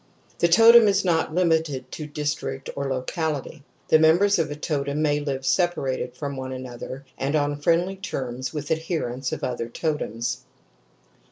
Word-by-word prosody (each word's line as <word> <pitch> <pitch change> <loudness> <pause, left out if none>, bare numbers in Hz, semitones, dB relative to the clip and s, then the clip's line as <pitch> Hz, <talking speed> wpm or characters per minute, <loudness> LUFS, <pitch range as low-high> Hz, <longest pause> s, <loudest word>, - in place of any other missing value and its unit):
The 170 - +4
totem 225 +5 +8
is 200 -1 +2
not 165 -2 +1
limited 160 -7 +1
to 155 - -6
district 145 -2 -3
or 140 0 -2
to 135 - -1
locality; 150 +2 -3 0.3
the 155 - +6
members 175 +5 +4
of 160 -3 0
a 145 - -4
totem 145 -1 -2
may 145 -1 +2
live 135 -2 -3
separated 130 -4 0
from 140 -2 -4
one 130 0 -5
another 130 +1 -7
and 140 +3 0
on 145 -1 0
friendly 175 +5 +2
terms 130 -9 -4
with 150 0 -5
adherents 155 -6 -2
of - - -5
other 120 -2 -3
totems^. 125 -5 -2
145 Hz, 160 wpm, -24 LUFS, 130-165 Hz, 0.3 s, totem